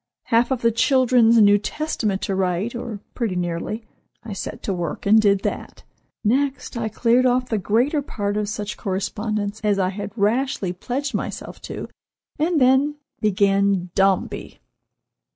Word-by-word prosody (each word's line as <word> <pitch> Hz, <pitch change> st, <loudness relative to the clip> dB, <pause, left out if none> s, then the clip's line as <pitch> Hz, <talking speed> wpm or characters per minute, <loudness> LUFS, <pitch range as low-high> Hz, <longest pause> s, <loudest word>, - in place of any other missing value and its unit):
Half 230 Hz, 0 st, +3 dB
of 260 Hz, -3 st, -2 dB
the 230 Hz, -, +4 dB
children's 235 Hz, -1 st, +4 dB
New 205 Hz, -1 st, +6 dB
Testament 215 Hz, -6 st, -2 dB
to 195 Hz, -, -1 dB
write, 190 Hz, +3 st, 0 dB
or 235 Hz, -4 st, -6 dB
pretty 225 Hz, -7 st, -2 dB
nearly. 180 Hz, +5 st, -3 dB, 0.4 s
I 225 Hz, -3 st, -6 dB
set 195 Hz, -, -6 dB
to 195 Hz, -, -1 dB
work 175 Hz, -4 st, -4 dB
and 215 Hz, +2 st, +6 dB
did 200 Hz, -2 st, +3 dB
that. -, -, -4 dB, 0.4 s
Next, 270 Hz, +5 st, 0 dB
I 230 Hz, -2 st, -2 dB
cleared 240 Hz, +3 st, +3 dB
off 250 Hz, 0 st, +1 dB
the 220 Hz, -, 0 dB
greater 245 Hz, -, +1 dB
part 205 Hz, -7 st, -3 dB
of 210 Hz, -1 st, -1 dB
such 210 Hz, -1 st, -4 dB
correspondence 205 Hz, +2 st, -3 dB
as 205 Hz, -2 st, +2 dB
I 185 Hz, -2 st, +1 dB
had 200 Hz, +1 st, -5 dB
rashly 210 Hz, -2 st, 0 dB
pledged 260 Hz, +10 st, -3 dB
myself -, -, -5 dB
to, -, -, -5 dB, 0.5 s
and 320 Hz, +1 st, +2 dB
then—began 210 Hz, -9 st, +2 dB
Dombey!" 195 Hz, -1 st, 0 dB
215 Hz, 150 wpm, -22 LUFS, 200-245 Hz, 0.5 s, New